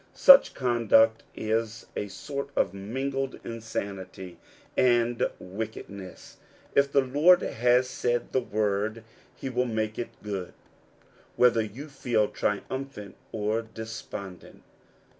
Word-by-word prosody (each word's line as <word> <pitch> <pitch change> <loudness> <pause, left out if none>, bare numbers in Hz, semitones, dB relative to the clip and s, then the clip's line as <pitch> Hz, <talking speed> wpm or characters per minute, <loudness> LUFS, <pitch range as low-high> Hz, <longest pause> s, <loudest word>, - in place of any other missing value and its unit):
Such 275 0 +8
conduct 115 -3 +3
is 110 +1 -2
a 105 - -2
sort 140 +7 -5
of 95 - +1
mingled 135 +7 -3
insanity 100 -5 -6 0.4
and 120 -1 +3
wickedness. 100 -1 -8 0.4
If 140 0 +3
the 140 - +5
Lord 145 +8 +5
has 125 +2 +2
said 120 -1 -1
the 130 - +2
word, 105 +1 -1 0.3
he - - -6
will 125 -1 0
make 110 -1 -2
it 120 - -3
good, 100 -4 -4 0.8
whether 120 -2 +5
you 115 +8 -7
feel 120 -6 0
triumphant 105 0 -3 0.2
or 110 +1 -1
despondent. 110 -4 -8
115 Hz, 110 wpm, -27 LUFS, 105-125 Hz, 0.8 s, Such